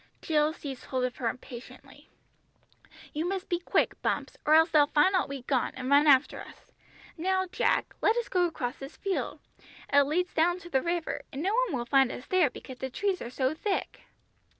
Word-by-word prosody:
Jill 305 -1 +1
seized 275 -5 -8
hold 260 -1 -2
of 250 -1 -2
her 235 -3 0
impatiently. 245 0 -11 1.0
"You 310 +1 -1
must 385 -1 -4
be 345 - 0
quick, 345 - 0
Bumps, - - -2
or 305 - +6
else 320 +1 +5
they'll 300 -2 +5
find 300 +6 +3
out 370 -6 +1
we've 275 -3 -6
gone, 265 -3 0
and 255 +1 -4
run 290 +2 +6
after 275 -1 +4
us. - - -14 0.5
Now, 375 +3 +1
Jack, 360 - 0
let 450 - +3
us 475 - -1
go 360 -1 +2
across 270 -8 -3
this 270 0 -9
field, 390 -2 -3 0.5
it 285 - +7
leads 340 +6 0
down 345 +2 +2
to 345 - -12
the 265 - +2
river, 340 0 -2
and 275 +3 -5
no 390 +3 +1
one 470 - +1
will 240 - -3
find 270 +1 +3
us 250 - -8
there 365 -6 +3
because 255 0 -11
the 265 - -3
trees 390 +7 -1
are 235 - -5
so 260 +2 0
thick." 390 +5 -3
305 Hz, 200 wpm, -28 LUFS, 265-360 Hz, 1.0 s, it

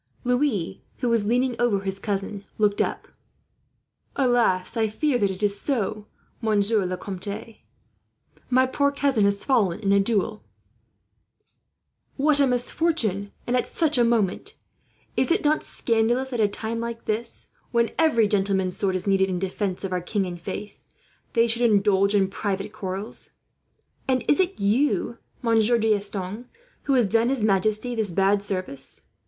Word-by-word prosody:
Louis, 245 - 0 0.2
who 245 - -1
was 230 -3 +2
leaning 245 +3 +1
over 220 -5 +2
his 195 0 -4
cousin, 200 0 -3
looked 210 -1 +2
up. - - -2 1.1
"Alas! 240 -8 +2
I 225 -1 +2
fear 250 +4 0
that 200 - +2
it 190 +2 -6
is 200 -1 +1
so, 215 -6 -2 0.3
Monsieur 210 -2 +1
le 180 0 -3
Comte. 200 +4 -7 0.9
My 255 +1 +4
poor 280 +2 +1
cousin 275 -7 +2
has 200 0 0
fallen 215 -10 +2
in 200 -2 0
a 200 - +5
duel." 215 +1 0 1.7
"What 290 +1 +3
a 280 - +5
misfortune, 245 - +1
and 245 - 0
at 250 - +1
such 310 -6 +1
a - - +5
moment! 230 - 0 0.6
Is - - +1
it 350 +5 +2
not 305 +1 +2
scandalous 240 +3 +1
that, 245 -3 -4
at 215 - +5
a - - -9
time 225 +2 -4
like 235 0 -5
this, 225 +2 -3 0.2
when 235 -1 +2
every 270 -10 +4
gentleman's 195 -3 +1
sword 190 -2 0
is 185 - -2
needed 195 -1 +2
in 185 - -1
defence 190 +1 -3
of 190 -1 -3
our 180 - -1
king 195 +2 -1
and 175 -1 -7
faith, 205 +4 -7 0.5
they 230 0 +4
should 230 +1 -1
indulge 200 -3 +3
in 195 -2 +3
private 200 +1 -3
quarrels? 195 0 -4 0.8
"And 260 -1 +1
is 295 - +3
it 375 0 0
you, 235 +3 +1 0.2
Monsieur 230 0 +3
D'Estanges, 210 0 -1 0.4
who 280 - +1
has 250 -3 +4
done 225 +4 +2
his 265 -5 0
majesty 215 +4 +1
this 220 -3 0
bad 195 +3 +2
service?" 185 -9 -3
215 Hz, 160 wpm, -24 LUFS, 195-245 Hz, 1.7 s, a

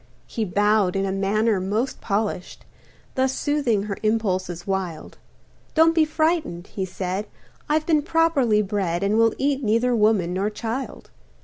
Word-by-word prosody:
He 225 - -3
bowed 205 0 +2
in 195 0 0
a 195 - -1
manner 200 +2 +1
most 210 +8 -2
polished, 205 -3 -3 0.5
Thus 265 0 +1
soothing 275 -9 +1
her 200 -2 -4
impulses 185 -5 -1
wild; 190 -5 -4 0.6
"Don't 325 +1 +5
be 320 -2 +4
frightened," 310 - -1
he 190 -1 -4
said, 185 +2 -4 0.4
"I've 310 +1 +1
been 315 -3 +3
properly 290 -9 +2
bred 190 -3 -1
And 210 +3 +2
will 225 -1 +3
eat 280 0 0
neither 230 +3 +2
woman 210 -5 +2
nor 195 +3 0
child." 230 +5 -5
215 Hz, 145 wpm, -23 LUFS, 195-265 Hz, 0.6 s, Don't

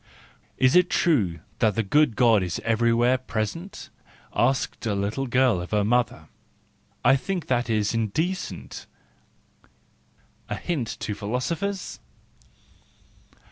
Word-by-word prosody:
" - - -35
Is 130 +3 +3
it 180 0 +5
true 100 - +1 0.2
that 110 -3 +2
the 115 - +1
good 145 +3 +3
God 115 -4 +4
is 90 -2 -3
everywhere 115 +2 +2
present? 130 - -5 0.2
" - - -28
asked 135 0 0
a 105 - 0
little 105 +7 -2
girl 125 -6 +2
of 90 - -7
her 105 -1 +1
mother: 120 +3 0 0.4
" - - -30
I - - +7
think 180 +4 -3
that 120 -2 0
is 105 -1 +1
indecent 155 - -3 0.8
" - - -34 0.6
:—a - - -2
hint 150 -10 -2
to 105 - -2
philosophers! 140 - -3
120 Hz, 135 wpm, -25 LUFS, 105-135 Hz, 0.8 s, I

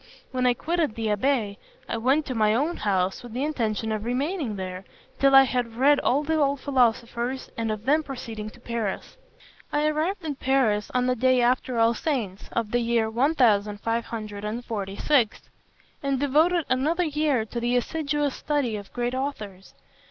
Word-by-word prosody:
When 255 -1 +1
I 245 - +3
quitted 325 -4 -1
the 225 -1 -2
abbé, 210 -2 0 0.3
I - - -2
went 270 +6 +2
to 255 - -3
my 215 -2 +2
own 300 +8 0
house 190 -2 0
with 240 -2 -10
the 255 +3 -2
intention 225 -7 -1
of 215 -1 -2
remaining 265 - -2
there, 185 -1 -5 0.4
till 275 0 +5
I 270 - +10
had 245 -3 -2
read 280 +4 +4
all 280 +4 +1
the 315 +1 0
old 280 -1 +2
philosophers, 245 -1 0
and 225 -1 -2
of 215 0 -5
then 300 +4 +3
proceeding 230 -7 -6
to 240 - -17
Paris. 235 -4 -4 0.6
"I 295 +1 +1
arrived 320 +5 -1
in 290 -3 -3
Paris 250 -7 +1
on 250 0 +2
the 255 0 +1
day 255 +1 +3
after 245 0 +1
All 230 0 +4
Saints, 230 - -3
of 225 -2 -2
the 240 - +2
year 230 -2 +1
1546, 220 -2 0 0.6
and 275 -2 0
devoted 310 +4 +3
another 305 +8 +1
year 300 -7 +1
to 235 +2 -5
the 240 +1 0
assiduous 290 +1 -1
study 280 -8 -1
of 200 -1 -10
great 245 0 -1
authors. 215 -9 -5
245 Hz, 165 wpm, -25 LUFS, 220-280 Hz, 0.6 s, I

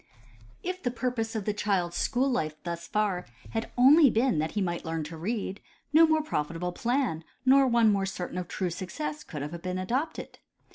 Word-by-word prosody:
If 365 +1 -3
the 245 - 0
purpose 240 -2 -2
of 215 -3 -2
the 210 - 0
child's 190 -5 0
school 260 +1 +1
life 155 - -1
thus 170 -1 -5
far 200 -4 0 0.2
had 225 0 -1
been - - -20
only 280 +4 +8
that 220 -11 +1
he 210 - -1
might 175 -3 -1
learn 165 -1 -2
to 160 +2 -7
read, 195 +3 -3 0.3
no 325 +2 +8
more 315 -1 +2
profitable, 170 - -2
plan 240 - -1 0.2
nor 270 +1 +6
one 235 -3 +4
more 195 -1 +1
certain 180 -1 -4
of 180 - -5
true 180 -2 -2
success 300 - -5
could 150 - -6
have 165 +3 -6
been 185 0 -3
adopted. 255 - -3
205 Hz, 190 wpm, -28 LUFS, 175-255 Hz, 0.3 s, only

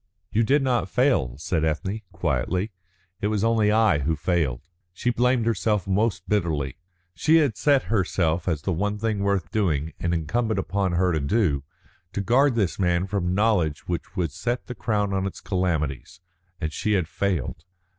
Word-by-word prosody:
"You 110 - +2
did 135 +5 +3
not 120 -7 +1
fail," 105 - +1
said 80 +1 -1
Ethne, 95 +7 -1
quietly; 85 - -1 0.5
"it 105 - +1
was 105 -1 0
only 115 -2 +3
I 110 -7 +4
who 80 +4 0
failed." 75 -6 0 0.3
She 120 +7 0
blamed 125 0 +2
herself 105 -2 +1
most 95 -1 0
bitterly. 80 -9 -1 0.3
She 150 - +3
had 145 -9 +3
set 140 +2 +3
herself, 90 -4 0
as 80 -4 -1
the 95 - 0
one 105 +5 -1
thing 110 -1 -1
worth 100 -1 0
doing, 80 -8 0
and 85 - -1
incumbent 105 +7 0
on 100 -3 +1
her 90 0 +2
to 80 - +1
do, 70 -2 +1 0.5
to - - -2
guard 125 +6 +3
this 100 -6 0
man 90 -1 +2
from 95 -2 -1
knowledge 95 -8 +1
which 85 +2 -4
would 85 -6 -1
set 110 - -3
the 125 - -6
crown 105 -4 -1
on 95 0 0
his 95 - -5
calamities, 80 -9 -2 0.4
and 80 0 -3
she 105 - 0
had 90 -6 +1
failed. 85 -5 -2
95 Hz, 175 wpm, -25 LUFS, 80-110 Hz, 0.5 s, I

